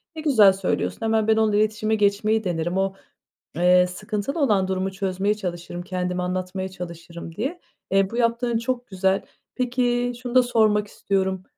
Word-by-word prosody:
Ne 315 - -5
güzel 220 -11 +6
söylüyorsun, 190 +3 -2
"hemen 220 -1 +1
ben 220 0 +4
onunla 220 -2 +2
iletişime 215 +1 +1
geçmeyi 210 +1 +2
denerim. 175 -1 -1
O, 195 0 0 0.6
eee, 180 +2 +5
sıkıntılı 210 - -4
olan 210 -10 +2
durumu 190 0 -1
çözmeye 195 +1 -1
çalışırım, 175 -3 -5
kendimi 180 0 -3
anlatmaya 185 +1 -3
çalışırım" 170 -2 -9
diye. 285 - -3 0.3
Eee, 195 0 +3
bu 235 - -5
yaptığın 235 0 +1
çok 245 +1 -3
güzel. 190 0 +1 0.3
Peki, 245 -1 0
şunu 245 0 -5
da 255 - +7
sormak 215 -3 +2
istiyorum, 190 -2 -1
200 Hz, 155 wpm, -23 LUFS, 185-225 Hz, 0.6 s, da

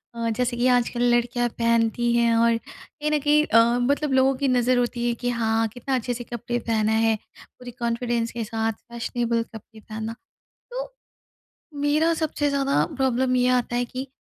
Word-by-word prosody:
अ 230 0 -1
जैसे 245 -1 0
कि 245 +1 +2
आजकल 245 -1 +2
लड़कियाँ 240 0 0
पहनती 230 0 +1
हैं 235 -1 +3
और 230 0 +3
कहीं 285 +4 -7
न 300 - +2
कहीं 300 +1 +3
अ, 230 +2 +4
मतलब 285 +4 0
लोगों 265 +1 +4
की 280 +1 0
नज़र 250 0 +2
होती 240 0 0
है 240 - +1
कि 245 +1 -3
हाँ, 225 -1 +1
कितना 245 +4 -3
अच्छे 245 0 -2
से 240 0 -6
कपड़े 240 0 -4
पहना 220 -2 0
है, 225 0 +3 0.4
पूरी 250 -1 -9
कॉन्फिडेंस 235 0 -1
के 235 0 -4
साथ 225 +1 -2
फ़ैशनेबल 235 +1 -3
कपड़े 220 -1 -13
पहनना। 220 +1 -6 0.6
तो - - -4 0.9
मेरा 305 +3 +2
सबसे 310 -2 -1
ज़्यादा 275 0 +1
प्रॉब्लम 260 -1 +1
ये 250 0 +3
आता 240 0 -3
है 245 - +1
कि 255 +2 -6
240 Hz, 175 wpm, -24 LUFS, 230-260 Hz, 0.9 s, अ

